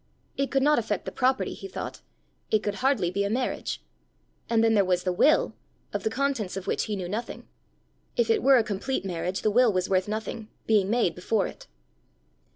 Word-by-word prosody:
It 275 0 -1
could 270 -1 +2
not 300 -1 +4
affect 210 -4 -2
the - - -4
property, 260 +1 +1
he - - -8
thought: 385 - -6 0.5
it 215 -1 +2
could 205 - -1
hardly 250 -10 +2
be 200 +2 0
a 200 - -1
marriage! 250 +4 -2 0.7
And 225 -1 +3
then 225 0 +4
there 205 -2 +5
was 180 -1 +1
the 185 - 0
will 295 +12 +4 0.4
of - - -1
the 220 - 0
contents 245 -7 -1
of 190 - -5
which - - 0
he 210 - -2
knew 185 -3 -4
nothing! 215 +6 -5 0.7
If 475 -1 +3
it 440 - +2
were 270 0 +6
a 235 - +4
complete 215 +3 -2
marriage, 180 0 -3
the 215 - +3
will 240 +1 +5
was 185 0 -1
worth 185 0 +2
nothing, 215 +1 -4 0.2
being 205 -3 +3
made 225 -7 +2
before 195 +3 0
it! - - -9
215 Hz, 205 wpm, -27 LUFS, 190-255 Hz, 0.7 s, were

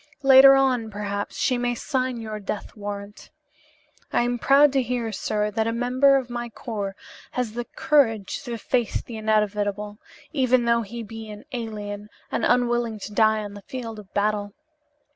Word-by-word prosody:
"Later 270 0 +9
on, 255 -4 +2
perhaps, 205 -1 -4
she 250 -1 +1
may 245 0 0
sign 255 -2 -2
your 215 -1 -5
death 205 +2 -5
warrant. 205 -1 -7 0.8
I - - +2
am 245 0 -1
proud 280 +2 +5
to 270 - +3
hear, 240 -2 -2
sir, 210 +1 -1
that 220 +1 0
a - - +1
member 255 +4 +3
of 260 -2 -3
my 240 -1 -5
corps 205 -4 -5 0.4
has 245 -4 -2
the 240 +1 -4
courage 225 -11 +1
to 235 -1 -4
face 240 0 -1
the 230 - -8
inevitable, 210 -1 0 0.3
even 255 -4 +3
though 235 0 +3
he 230 +2 -6
be 225 0 -9
an 210 0 -10
alien 210 -4 -5 0.2
and - - -1
unwilling 240 -2 +2
to 210 - -7
die 215 0 +3
on 205 -1 -7
the 205 - -10
field 230 -1 -7
of 200 -2 -14
battle. 205 0 0
225 Hz, 170 wpm, -24 LUFS, 210-245 Hz, 0.8 s, Later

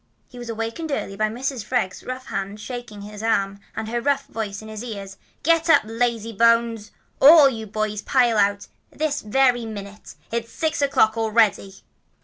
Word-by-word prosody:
He 245 - -12
was 240 -1 -8
awakened 230 +8 -4
early 195 -7 -3
by 215 +1 0
Mrs. 250 +1 -4
Freg's 210 -5 -2
rough 255 0 -6
hand 195 +2 -4
shaking 240 -3 -7
him 205 - -9
by 210 - -11
the 225 - -3
arm, 200 -2 0 0.2
and 220 - -4
her 235 +1 -2
rough 280 +1 0
voice 210 -3 -5
in - - -10
his 215 +1 -7
ears: 200 -5 -7 0.3
"Get 330 +2 +2
up, 305 -3 +6
lazy 230 0 -1
bones! 230 0 +2 0.3
All 300 0 +9
you 225 -4 -4
boys 215 0 -2
pile 240 -4 +2
out, 200 0 +1 0.2
this 300 -2 -2
very 245 +1 +2
minute! 205 -1 -9 0.2
It's 230 0 -3
six 315 +2 -2
o'clock 235 -5 +3
already!" 215 -3 +1
225 Hz, 180 wpm, -23 LUFS, 210-250 Hz, 0.3 s, All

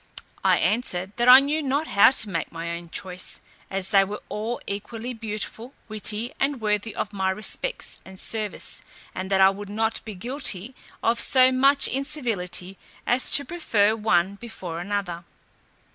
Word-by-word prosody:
I - - +4
answered, 185 -1 0
"That 240 +1 +3
I 255 +1 +12
knew 295 +3 0
not 285 +2 0
how 200 -9 +6
to 225 -5 +1
make 165 -4 -3
my 170 +1 -5
own 170 0 -7
choice, 180 +1 -3 0.3
as 190 -1 -2
they 195 -2 +5
were 205 +2 -6
all 220 +3 -3
equally 225 +4 -5
beautiful, 225 +3 -5
witty, 215 +2 -1
and 275 -1 0
worthy 210 0 -1
of 210 - -3
my 190 -1 0
respects 215 - -2
and 190 0 -11
service, 215 -2 -3 0.3
and 185 0 -5
that 195 -1 +3
I 190 0 +7
would 200 +1 -8
not 220 +2 -1
be 215 -3 -8
guilty 240 0 -1 0.3
of 230 +1 +2
so 260 -1 +6
much 275 +2 +4
incivility 225 -10 -3 0.3
as 250 +2 +2
to 285 - +5
prefer 225 -11 +1
one 195 -4 +1
before 185 -7 -7
another." 180 -2 -3
215 Hz, 160 wpm, -24 LUFS, 190-250 Hz, 0.3 s, I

